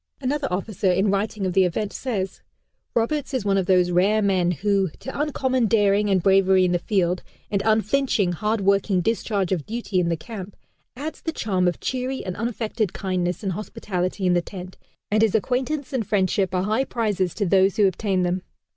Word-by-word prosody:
Another 280 Hz, +1 st, -1 dB
officer 195 Hz, 0 st, 0 dB
in 195 Hz, +3 st, +2 dB
writing 200 Hz, 0 st, -1 dB
of 185 Hz, -, -1 dB
the 190 Hz, -, +5 dB
event 195 Hz, +2 st, -1 dB
says: 195 Hz, -7 st, -3 dB, 0.5 s
"Roberts 270 Hz, +4 st, 0 dB
is 250 Hz, -, -1 dB
one 195 Hz, -1 st, +3 dB
of 185 Hz, -, -2 dB
those 180 Hz, -1 st, +3 dB
rare 195 Hz, +5 st, +3 dB
men 185 Hz, -3 st, +2 dB
who, 195 Hz, +2 st, +1 dB
to 265 Hz, +2 st, -5 dB
uncommon 260 Hz, -5 st, +1 dB
daring 205 Hz, -1 st, +3 dB
and 190 Hz, -3 st, +2 dB
bravery 190 Hz, -1 st, +4 dB
in 180 Hz, -, +1 dB
the 175 Hz, -, +1 dB
field, 180 Hz, -1 st, 0 dB, 0.3 s
and 200 Hz, -2 st, +1 dB
unflinching, 220 Hz, -1 st, +2 dB
hard 210 Hz, +5 st, -1 dB
working 195 Hz, -1 st, +2 dB
discharge 205 Hz, -2 st, -1 dB
of 170 Hz, -6 st, -1 dB
duty 220 Hz, -4 st, -2 dB
in 170 Hz, -1 st, +1 dB
the 165 Hz, -, 0 dB
camp, 200 Hz, +1 st, -8 dB, 0.4 s
adds 295 Hz, +5 st, -6 dB
the 325 Hz, -, -2 dB
charm 190 Hz, -, 0 dB
of 175 Hz, -, -1 dB
cheery 260 Hz, +1 st, -3 dB
and 185 Hz, -1 st, -4 dB
unaffected 225 Hz, -3 st, -2 dB
kindness 180 Hz, -1 st, -2 dB
and 195 Hz, -, -1 dB
hospitality 185 Hz, -1 st, -3 dB
in 180 Hz, -, +4 dB
the 175 Hz, -, +3 dB
tent, 185 Hz, 0 st, -9 dB, 0.4 s
and 215 Hz, +1 st, +3 dB
his 220 Hz, -2 st, +3 dB
acquaintance 260 Hz, +6 st, -1 dB
and 230 Hz, -6 st, -1 dB
friendship 190 Hz, -1 st, +1 dB
are 180 Hz, -, +1 dB
high 215 Hz, +6 st, +1 dB
prizes 205 Hz, -8 st, -1 dB
to 205 Hz, -, 0 dB
those 190 Hz, +1 st, +3 dB
who 210 Hz, -, +5 dB
obtain 190 Hz, 0 st, +1 dB
them." 180 Hz, +1 st, 0 dB
200 Hz, 190 wpm, -23 LUFS, 185-225 Hz, 0.5 s, the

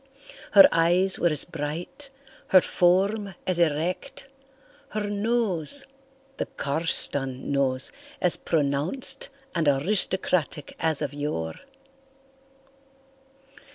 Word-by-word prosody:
Her 200 Hz, -2 st, +9 dB
eyes 175 Hz, +3 st, +2 dB
were 175 Hz, -, +2 dB
as 150 Hz, -3 st, +3 dB
bright, 165 Hz, -, -7 dB, 0.4 s
her 185 Hz, -, +6 dB
form 195 Hz, +3 st, +1 dB
as 185 Hz, -2 st, 0 dB
erect, 175 Hz, -, -2 dB, 0.6 s
her 210 Hz, -1 st, -2 dB
nose—the 270 Hz, -, -1 dB
Carston 140 Hz, -3 st, 0 dB
nose—as 140 Hz, -, -1 dB
pronounced 165 Hz, -, -1 dB, 0.2 s
and 165 Hz, -3 st, -1 dB
aristocratic 165 Hz, 0 st, +1 dB
as 160 Hz, -2 st, 0 dB
of 145 Hz, -1 st, -4 dB
yore. 145 Hz, -, -4 dB
175 Hz, 85 wpm, -25 LUFS, 145-215 Hz, 0.6 s, Her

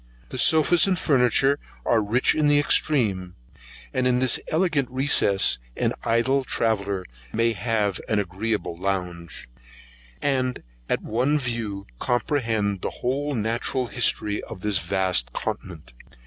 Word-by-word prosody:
The 130 Hz, -, -5 dB
sofas 160 Hz, +6 st, +5 dB
and 185 Hz, -2 st, +1 dB
furniture 135 Hz, 0 st, +3 dB, 0.3 s
are 115 Hz, -, +3 dB
rich 110 Hz, +5 st, +2 dB
in 155 Hz, -1 st, +1 dB
the 145 Hz, 0 st, +4 dB
extreme: 105 Hz, -11 st, +1 dB, 0.6 s
and 130 Hz, -1 st, +1 dB
in 125 Hz, -1 st, +2 dB
this 130 Hz, -1 st, +3 dB
elegant 155 Hz, -6 st, 0 dB
recess, 130 Hz, -, +3 dB, 0.2 s
an -, -, 0 dB
idle 130 Hz, +4 st, +1 dB
traveller 100 Hz, -6 st, -1 dB, 0.3 s
may 115 Hz, +1 st, +1 dB
have 105 Hz, -2 st, -1 dB
an 110 Hz, -, +1 dB
agreeable 100 Hz, -1 st, -2 dB
lounge, 90 Hz, -2 st, -4 dB, 0.7 s
and 130 Hz, -3 st, -1 dB, 0.3 s
at -, -, -1 dB
one 130 Hz, +7 st, +1 dB
view 115 Hz, -7 st, -4 dB
comprehend 115 Hz, -6 st, -1 dB
the -, -, -2 dB, 0.2 s
whole 140 Hz, +3 st, -1 dB
natural 115 Hz, +3 st, -1 dB
history 105 Hz, -3 st, 0 dB
of 95 Hz, -, -10 dB
this 105 Hz, -2 st, +1 dB
vast 90 Hz, -11 st, 0 dB
continent. 80 Hz, -8 st, -6 dB
115 Hz, 130 wpm, -24 LUFS, 100-130 Hz, 0.7 s, sofas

